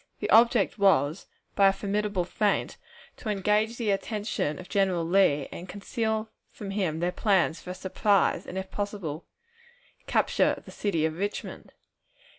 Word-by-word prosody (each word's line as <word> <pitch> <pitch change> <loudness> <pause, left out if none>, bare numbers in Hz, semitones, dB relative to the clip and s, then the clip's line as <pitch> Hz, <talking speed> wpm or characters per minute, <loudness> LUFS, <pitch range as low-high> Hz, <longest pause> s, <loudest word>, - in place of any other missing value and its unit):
The - - -2
object 230 -2 +4
was, 180 -4 +3 0.3
by 195 - +6
a - - +6
formidable 200 -1 -1
feint, 205 +2 0 0.4
to 220 - -6
engage 210 +3 +1
the 225 -4 0
attention 205 -6 -2
of 180 - -10
General 190 -4 +1
Lee, 165 -6 +3
and 180 +2 -8
conceal 220 +3 -2 0.2
from 200 -2 -8
him 180 -6 -1
their 175 +1 +1
plans 185 -5 +1
for - - -10
a 180 - -4
surprise 195 +1 +1
and, 185 - -6
if 190 0 -5
possible, 200 -7 -4 0.8
capture - - +2
of - - -14
the - - -11
city 170 -7 -1
of 160 +2 -3
Richmond. 205 +1 -5
195 Hz, 155 wpm, -27 LUFS, 180-210 Hz, 0.8 s, by